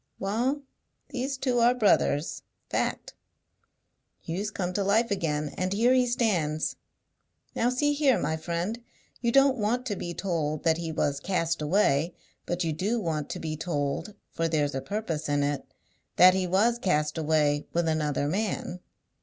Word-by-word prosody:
Wa'al, 245 +9 -1 0.5
these 265 +2 -3
two 255 -2 +1
are 240 +1 +5
brothers, 195 -8 +2 0.3
fact! - - -1 1.1
Hugh's 190 +6 -3
come 180 -4 -3
to 200 - 0
life 215 +3 +2
again, 150 -6 -1
and 185 0 0
here 235 +5 +4
he 255 -1 +3
stands. 175 -11 0 0.8
Now 240 - +2
see 290 +4 +1
here, 285 -3 +3
my 160 - -1
friend! 170 +8 -3 0.4
You 235 -1 +1
don't 275 0 +4
want 235 +4 0
to 210 -5 -2
be 175 -2 -5
told 155 -5 -2
that 160 -1 +3
he 165 -1 -3
was 145 -2 0
cast 170 -1 -1
away, 160 -1 +2 0.3
but 175 +1 -1
you 160 -2 -1
do 205 +9 -1
want 160 -6 -2
to - - -4
be 155 -1 -3
told 155 +4 -2 0.2
(for 165 - -1
there's 150 -3 0
a 135 - -2
purpose 170 -7 -3
in 145 0 +2
it) 145 -1 -2 0.4
that 185 0 +8
he 185 -1 0
was 220 +6 +2
cast 150 -7 +1
away 150 -2 +1
with 170 -1 0
another 150 -3 0
man. 185 0 -2
180 Hz, 160 wpm, -27 LUFS, 155-225 Hz, 1.1 s, that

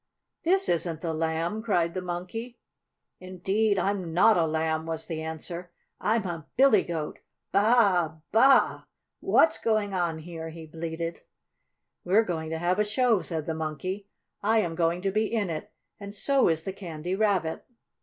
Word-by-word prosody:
"This 380 +3 +2
isn't 165 -2 0
the 165 -2 -2
Lamb!" 165 +6 -1
cried 175 -7 +1
the 185 - -3
Monkey. 185 +7 -5 0.6
"Indeed 195 +3 0
I'm 185 -3 -1
not 215 +5 +6
a 165 -2 +2
Lamb!" 160 0 -1
was 160 -1 -3
the 160 -2 -4
answer. 165 +2 -6 0.3
"I'm 220 0 +1
a 165 -4 -5
Billy 260 -7 +6
Goat! 160 -3 -4 0.3
Baa - - +4 0.5
a! 155 0 -12
Baa 220 - +4
a - - +7 0.2
a - - -7
a! - - -23 0.3
What's 325 - +3
going 215 -3 0
on 175 -3 0
here?" 165 0 -7
he 160 0 -9
bleated. 165 +1 -5 0.8
"We're 200 +5 +4
going 160 -5 -3
to 160 - -2
have 175 +4 0
a - - +5
show," 215 0 +2
said 160 -3 -4
the 160 - -2
Monkey. 160 +6 -4 0.3
"I 220 +2 +3
am 170 -5 -2
going 170 +1 0
to 195 - +1
be 215 +2 0
in 210 -6 0
it, 165 +6 -6 0.3
and 200 0 -8
so 275 +6 +3
is 160 -1 +1
the 190 - -4
Candy 175 -2 -5
Rabbit." 190 -6 0
175 Hz, 175 wpm, -27 LUFS, 160-205 Hz, 0.8 s, a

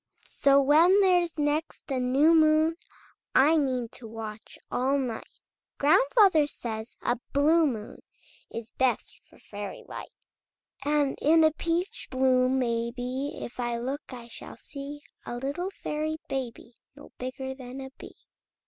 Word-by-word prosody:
So 275 0 +4
when 320 +8 +5
there's 355 -4 +3
next 295 0 -2
a 260 - 0
new 270 +6 +4
moon, 315 0 +4 0.6
I 290 +5 +6
mean 255 -5 0
to 230 - -10
watch 220 -1 -8
all 265 +3 +1
night! 250 -5 -3 0.5
Grandfather 385 - +5
says 220 -4 -6
a 240 - 0
blue 310 +3 +4
moon 220 -5 -5 0.5
Is 230 0 -7
best 260 -1 0
for - - -19
fairy 205 -1 -8
light, - - -7 0.7
And 290 -1 +1
in 320 +2 +5
a 315 - +5
peach 335 +4 -2
bloom, 255 0 +3
maybe, 245 +3 -2
If 240 - -9
I 240 -1 -1
look 265 +6 -5
I 240 -2 -9
shall 235 - -10
see 290 0 -8 0.2
A - - -5
little 285 +9 -3
fairy 310 -4 -3
baby 245 -2 -5 0.2
No 290 - -14
bigger 265 +1 -4
than 260 0 -9
a 265 0 -7
bee! - - -11
270 Hz, 140 wpm, -27 LUFS, 245-310 Hz, 0.7 s, I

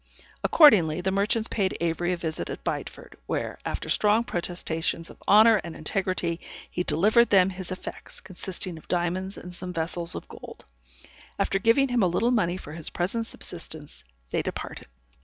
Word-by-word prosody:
Accordingly, 180 - +6
the 190 +1 0
merchants 210 +3 +1
paid 195 -3 -1
Avery 170 +1 0
a 180 - 0
visit 160 -1 -2
at - - -6
Bideford, - - -5
where, - - -3
after - - -4
strong 215 +2 +3
protestations 170 -4 -2
of - - -18
honor 220 +2 +7
and 170 -2 -7
integrity, 175 -1 -1 0.3
he 180 - -3
delivered 205 +9 +3
them 190 -1 +5
his 185 0 -6
effects, 185 - -7
consisting 185 -2 -5
of - - -20
diamonds 180 +2 -1
and 180 - -9
some 180 +1 -6
vessels 170 0 -1
of - - -7
gold. - - -11 0.7
After 195 - +1
giving 235 +6 +3
him 245 -1 +2
a 185 - +4
little 225 +8 +1
money 185 -7 +1
for 150 -5 -9
his 160 -1 -2
present 225 +6 -2
subsistence, 160 -7 -5 0.3
they - - +1
departed. - - -6
180 Hz, 165 wpm, -26 LUFS, 170-205 Hz, 0.7 s, honor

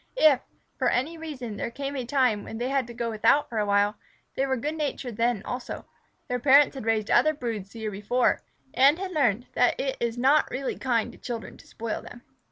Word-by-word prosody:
If, 300 - +6 0.4
for 255 -2 +3
any 280 +7 0
reason 270 -10 -6
there - - -2
came 275 +3 -5
a 255 -3 -3
time 250 -5 +2
when 225 - -7
they 245 +3 -2
had 270 -3 0
to 240 - -9
go 235 -1 -2
without 225 +7 +3
for 225 - -2
a 210 - 0
while, 205 +1 +2 0.4
they 270 - 0
were 265 -1 0
good 295 +6 -2
natured 280 -6 -3
then 230 -3 +1
also. 250 0 -5 0.4
Their 250 0 -1
parents 280 +3 +6
had 265 -5 -7
raised 220 -1 +1
other 310 0 +4
broods 225 -7 -4
the 225 +2 -10
year 215 -1 -2
before, 210 +5 +1 0.3
and 275 +4 +5
had 380 0 -4
learned 245 - +1
that 245 - +2
it 270 -1 -1
is 235 0 -1
not 275 +5 +4
really 265 +1 -3
kind 240 -2 0
to - - -16
children 235 -2 -6
to - - -17
spoil 230 -1 -4
them. 240 0 -12
245 Hz, 220 wpm, -26 LUFS, 225-275 Hz, 0.4 s, If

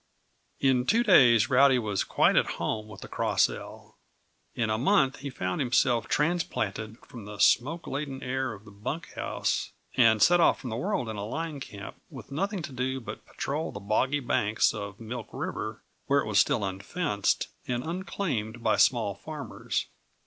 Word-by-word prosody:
In 130 -2 +2
two 230 +3 +4
days 120 - +6
Rowdy 135 +1 +6
was 105 -5 -1
quite - - +3
at - - +2
home 110 -1 -2
with 110 - -11
the - - -8
Cross - - +2
L. - - -10 0.6
In 110 -2 0
a 110 - +1
month 135 -2 +3
he 140 +1 -5
found 90 -6 -3
himself 120 -2 +2
transplanted 110 - -1
from 115 -5 -10
the 105 0 -8
smoke 145 +11 +3
laden 135 -1 -4
air 130 0 -1
of 105 0 -13
the 105 - -13
bunk 105 +11 -6
house, - - -2 0.2
and 115 -4 +5
set 175 +10 +6
off 170 - +4
from 125 - -6
the - - -2
world 120 0 -1
in 110 -1 -5
a 100 - -4
line 155 +6 -4
camp, 100 -6 -9
with - - -11
nothing 195 +4 -2
to - - -6
do 130 +1 -2
but 120 - -9
patrol 150 +3 -3
the 100 - -7
boggy 130 +8 +1
banks 110 -3 +2
of 100 -2 -6
Milk 115 +1 -6
River, - - -5 0.2
where 140 0 +3
it - - -5
was 105 -2 +3
still 100 +1 +2
unfenced 100 - -1 0.2
and 125 0 -1
unclaimed 155 - -3
by - - +3
small 115 -5 +3
farmers. 150 +9 -4
125 Hz, 180 wpm, -28 LUFS, 110-140 Hz, 0.6 s, days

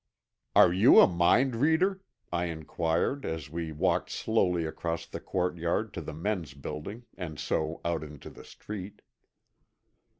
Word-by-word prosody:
"Are 85 - +7
you 100 +7 +7
a - - +10
mind 95 +9 +3
reader?" 170 +8 +2 0.3
I 85 0 0
inquired 85 - -1
as 80 -3 -5
we 80 -1 -4
walked 75 - 0
slowly 90 -7 +1
across 85 +1 -3
the 80 - -7
courtyard 90 +3 -1
to 85 - -5
the 80 - -6
men's 85 -5 -3
building 75 - -7
and 80 -5 -6
so 80 +1 -2
out 85 -2 -1
into 75 -2 -10
the - - -13
street. 100 -1 -9
85 Hz, 140 wpm, -29 LUFS, 80-105 Hz, 0.3 s, a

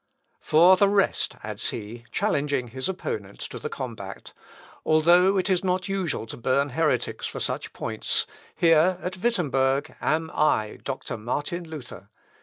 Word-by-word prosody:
"For 175 +4 +6
the 200 +1 +4
rest," 200 -1 +1
adds - - -3
he, 115 +2 -7
challenging 145 - 0
his 130 +7 -3
opponents 105 - -5
to - - -7
the - - -4
combat, 110 -6 -7 0.5
"although 175 +5 +5
it 185 - +1
is 185 -1 +1
not 185 0 0
usual 190 - -2
to 110 - -8
burn 135 +4 +1
heretics 155 +3 0
for - - -6
such - - -3
points, - - -1 0.3
here, 165 +2 +4
at 185 +1 -3
Wittemberg, 140 - 0
am 160 +1 0
I, 110 -8 +1
Doctor - - -4
Martin 145 +9 -3
Luther! 120 - -9
155 Hz, 145 wpm, -25 LUFS, 125-180 Hz, 0.5 s, For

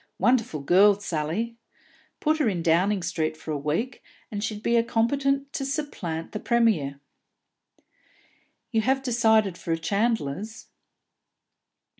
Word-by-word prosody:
Wonderful 225 - +1
girl, 195 +7 +5
Sally! 200 +6 -3 0.6
Put 315 +1 +1
her 275 -7 +3
in 175 -4 -2
Downing 180 +4 +2
Street 160 -3 -2
for 155 - -7
a 150 - -1
week, 165 - -2 0.3
and 205 -1 -3
she'd 215 -1 -4
be 235 0 +3
competent 275 +4 0
to 305 -4 -2
supplant 270 - -4
the 215 - -4
Premier!" 210 - +1 1.7
"You 225 -2 +2
have 265 +3 +1
decided 220 -6 +2
for 165 - -4
a 165 - +2
chandler's?" 205 +1 -2
215 Hz, 125 wpm, -26 LUFS, 165-235 Hz, 1.7 s, girl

